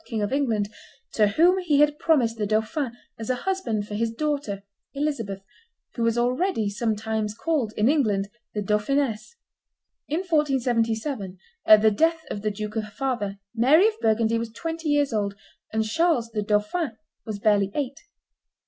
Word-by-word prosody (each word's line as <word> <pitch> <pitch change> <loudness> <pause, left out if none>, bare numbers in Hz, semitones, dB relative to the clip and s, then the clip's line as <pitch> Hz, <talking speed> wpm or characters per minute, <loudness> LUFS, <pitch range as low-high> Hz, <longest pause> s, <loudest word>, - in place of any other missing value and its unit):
King 220 -4 -2
of 205 - -2
England, 225 -8 +1 0.4
to 210 -2 +3
whom 345 - +4
he 315 -6 +2
had 295 0 +3
promised 255 -10 +2
the 210 -2 -1
dauphin 230 +4 -1 0.2
as 225 - -6
a 255 - +2
husband 245 - -2
for 210 - -7
his 225 +2 0
daughter 275 -7 -2 0.3
Elizabeth, 230 -10 -2 0.5
who 235 - -5
was 230 0 +2
already 245 - +1
sometimes 215 -1 -2
called, 280 -5 -1
in 210 - +3
England, 215 -10 +2 0.3
the 210 - -1
Dauphiness. 220 - 0 0.7
In 315 +5 -1
1477, 245 - 0 0.3
at 215 0 +8
the 220 - +6
death 325 +8 +2
of 205 - -4
the 215 - 0
duke 210 +1 -5
her 220 - 0
father, 215 -2 -3 0.2
Mary 280 - +5
of 440 0 -10
Burgundy 225 +1 +2
was 230 0 -4
twenty 325 +6 -4
years 290 -3 +2
old, 200 -2 -1 0.4
and 220 0 0
Charles, 270 -2 +1
the 215 -2 -1
dauphin, 215 - 0 0.3
was 215 -3 -5
barely 200 -1 +2
eight. 275 -2 -2
230 Hz, 160 wpm, -25 LUFS, 210-290 Hz, 0.7 s, at